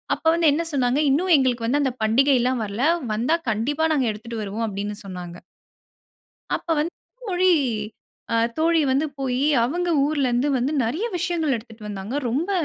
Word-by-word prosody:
அப்ப - - -20
வந்து 335 -2 +4
என்ன 325 +3 0
சொன்னாங்க, 255 0 +1
"இன்னும் 350 +6 +2
எங்களுக்கு 245 -4 0
வந்து 285 +5 +2
அந்த 265 -3 0
பண்டிகைலாம் 255 +1 +3
வரல. 210 +7 -2 0.3
வந்தா 245 +10 +1
கண்டிப்பா 280 +9 0
நாங்க 270 -5 +1
எடுத்துட்டு 225 +1 -7
வருவோம்." 210 +3 -3
அப்படீன்னு 205 +1 -4
சொன்னாங்க. 180 -2 -7 1.2
அப்ப - - -8
வந்து 320 +4 -1 0.4
மொழி 370 0 +3 0.8
அ - - +3 0.2
தோழி 330 +1 +3
வந்து 270 +4 +2
போயி, 260 0 -1 0.2
அவங்க 350 +7 -2 0.2
ஊர்ல 285 -3 0
இருந்து 245 +4 +1
வந்து 255 +4 0
நெறைய 305 - -1
விஷயங்கள் 335 -4 0
எடுத்துட்டு 225 -2 -9
வந்தாங்க. 205 +4 -5
ரொம்ப 295 - -1
260 Hz, 155 wpm, -23 LUFS, 225-310 Hz, 1.2 s, வந்து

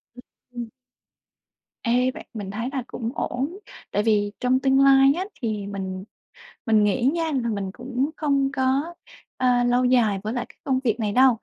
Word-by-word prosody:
Ừm, 245 - -11 0.3
ừm. 235 -1 -5 1.1
Ê, 250 +2 +2
vậy - - -9
mình 205 -4 -5
thấy 230 +5 -3
là 265 - -2
cũng 230 -2 -4
ổn. 280 +9 -3 0.3
Tại 205 - +1
vì 205 -2 +2
trong 255 +1 +2
tương 270 0 +3
lai 275 0 +6
á 365 +2 -2 0.2
thì 210 -3 -2
mình 190 -2 -5 0.6
mình 220 -3 +4
nghĩ 210 +4 +1
nha 335 -1 0 0.2
là 235 - -1
mình 200 -3 -3
cũng 255 +5 -2
không 275 -3 +1
có, 275 +4 0 0.4
ơ, 250 -1 +3
lâu 245 +1 +2
dài 230 -6 +3
với 215 - -3
lại 245 -1 -2
cái - - -18
công 260 -1 +1
việc 235 -2 0
này 210 -2 0
đâu. 255 0 +5
245 Hz, 185 wpm, -24 LUFS, 215-265 Hz, 1.1 s, lai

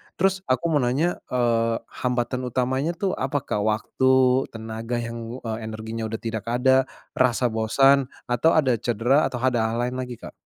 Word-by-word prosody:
Terus, 190 +1 +1
aku 130 -1 +1
mau 150 - +3
nanya, 140 +8 0
eee, 115 -2 +1 0.3
hambatan 125 0 -1
utamanya 130 +5 0
tuh, 195 0 -1
apa 135 +2 0
Kak? 105 - -2
Waktu, 125 +4 -1 0.5
tenaga 115 +2 -5
yang, 115 0 -5 0.2
eee, 110 -1 -3
energinya 110 +1 -5
udah 110 0 -5
tidak 110 -1 -4
ada, 130 +2 +3 0.3
rasa 125 -1 +2
bosan, 135 +5 +3 0.2
atau, 125 +7 +3
ada 130 -6 +3
cedera? 120 +6 +2
Atau, 125 - -5
ada 125 -3 +2
hal 115 - -2
lain 125 +1 -2
lagi 125 -1 -5
Kak? - - -8
125 Hz, 165 wpm, -24 LUFS, 115-130 Hz, 0.5 s, mau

